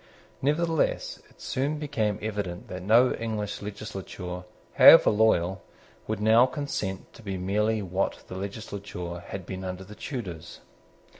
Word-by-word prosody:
Nevertheless 160 +3 0
it - - -25
soon 140 +4 -1
became 130 -9 -1
evident 100 -5 -4
that 90 0 -6
no 115 +7 +5
English 110 -3 -3
legislature, 95 -3 -6 0.3
however - - +9
loyal, 95 -4 +2 0.5
would 110 -1 -2
now 110 +4 +6
consent 115 -10 -4
to - - -14
be 100 -3 -4
merely 105 +4 0
what 95 +1 -2
the - - -8
legislature 100 -3 -6
had 95 +1 -7
been 95 +1 -6
under 90 0 -5
the 100 +3 -11
Tudors. 95 - -7
105 Hz, 135 wpm, -27 LUFS, 95-110 Hz, 0.5 s, however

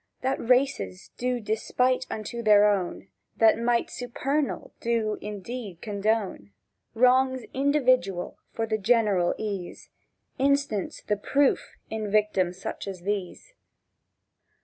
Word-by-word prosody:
—That 265 +1 0
races 230 - +1
do 250 0 -1
despite 250 +4 0
unto 220 +2 -5
their 210 -2 +6
own, 195 -2 -1 0.3
That 225 0 +5
Might 235 0 +1
supernal 270 +4 -2
do 225 -2 0
indeed 210 -2 -6
condone 205 - -2 0.4
Wrongs 255 +1 +4
individual 255 -10 +1
for 225 - -2
the 220 -1 -1
general 205 -5 +2
ease, 200 -5 -5 0.5
Instance 275 -7 0
the 210 - 0
proof 275 +7 +1 0.2
in 215 -1 -3
victims 195 -4 +1
such 195 - -5
as 190 -3 -6
these. 200 - -4
220 Hz, 110 wpm, -26 LUFS, 200-250 Hz, 0.5 s, their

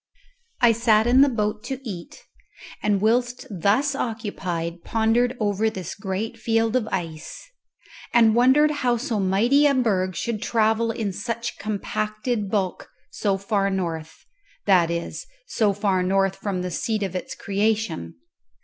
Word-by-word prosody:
I 240 -1 +7
sat 220 -1 +3
in 250 +3 +5
the 280 - +6
boat 215 -3 -2
to 265 +1 -4
eat, 190 - -8 0.6
and 205 -2 +1
whilst 240 +3 +1
thus 210 - +1
occupied 185 -9 -4
pondered 235 +3 +1
over 210 0 +1
this 185 -5 -6
great 215 +3 -4
field 225 0 +1
of 240 -4 +1
ice, 165 - -5 0.6
and 225 -2 +5
wondered 260 +6 +5
how 245 -1 +2
so 230 -3 -2
mighty 230 +10 +3
a 280 - +2
berg 190 -7 +1
should 230 -3 -3
travel 225 0 +1
in 220 -4 -2
such 235 +3 -4
compacted 215 +1 -2
bulk 195 -3 -2 0.2
so 200 -2 0
far 200 0 0
north 165 -4 -4 0.4
that 180 -4 +4
is, 170 - -4 0.2
so 220 - +1
far 195 -2 0
north 195 +1 +1
from 190 -3 -3
the 180 - -3
seat 215 +5 -1
of 190 -2 -4
its 180 - -5
creation. 200 - -1
215 Hz, 145 wpm, -24 LUFS, 190-235 Hz, 0.6 s, I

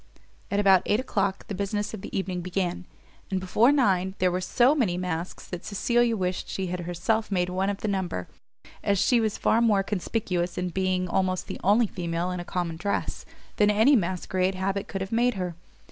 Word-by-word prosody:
At 200 - 0
about 195 -3 +6
eight 210 - +3
o'clock 200 -6 -1
the - - -4
business 205 +2 -2
of 215 - -6
the - - -5
evening 185 -2 -2
began; 180 0 -2 0.4
and 190 - 0
before 215 +7 +3
nine, 190 -9 +2
there 185 -1 +2
were 180 +1 -1
so 245 +8 +4
many 220 -12 +1
masks 180 -1 -4
that 180 -1 -6
Cecilia 235 +2 +1
wished 180 -1 -2
she 190 - -2
had 180 0 -3
herself 175 +6 -1
made 180 -2 +1
one 190 +2 0
of 200 -1 -3
the - - -2
number, 185 - -2 0.6
as 200 - +2
she 240 +6 +3
was 215 -2 -1
far 230 - +2
more 210 -4 +3
conspicuous 185 -3 -2
in 180 0 -1
being 185 0 0
almost 185 0 0
the - - -6
only 210 +5 +4
female 175 -2 -3
in 180 - -3
a - - -4
common 175 -2 -3
dress, 200 +4 -2 0.3
than 210 -1 +4
any 220 +7 +5
masquerade 185 -1 0
habit 195 +1 -2
could 195 - -4
have 190 - -4
made 240 +1 +2
her. 180 -2 -3
190 Hz, 200 wpm, -26 LUFS, 180-210 Hz, 0.6 s, about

